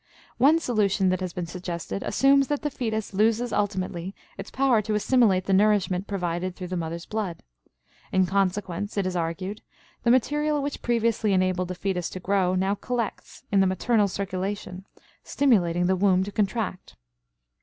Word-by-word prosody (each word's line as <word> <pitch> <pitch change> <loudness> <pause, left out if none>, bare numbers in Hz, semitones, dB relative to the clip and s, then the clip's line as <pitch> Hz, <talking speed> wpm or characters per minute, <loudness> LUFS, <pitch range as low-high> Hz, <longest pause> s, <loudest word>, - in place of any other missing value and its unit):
One 285 +6 +6
solution 210 - +1
that 185 - 0
has 185 -2 -3
been 175 0 -4
suggested 175 +1 -5
assumes 275 0 +3
that 290 0 -2
the 295 - -1
fetus 220 -5 -3
loses 225 +4 +1
ultimately 190 -2 -2 0.2
its 195 - -8
power 260 -4 +2
to 210 0 -2
assimilate 210 -4 +3
the 195 - +1
nourishment 200 -2 +2
provided 180 -2 -2
through 180 -1 -7
the 185 - -3
mother's 170 0 -4
blood. 205 -6 -4 0.7
In 190 0 +3
consequence, 195 +1 -1
it 200 - +1
is 185 -1 -2
argued, 180 +5 -3 0.4
the 235 - +1
material 295 +4 +2
which 285 0 -4
previously 230 -3 +1
enabled 185 -1 +1
the 185 - -5
fetus 180 -1 -2
to 185 - -7
grow 185 -1 +1
now 190 +2 +1
collects 235 +2 -4
in 200 - +4
the 190 - +4
maternal 205 +3 +2
circulation, 190 0 -4 0.4
stimulating 180 -11 +2
the 190 +1 +2
womb 185 -1 +3
to 200 - -5
contract. 200 -2 -2
195 Hz, 165 wpm, -25 LUFS, 185-220 Hz, 0.7 s, One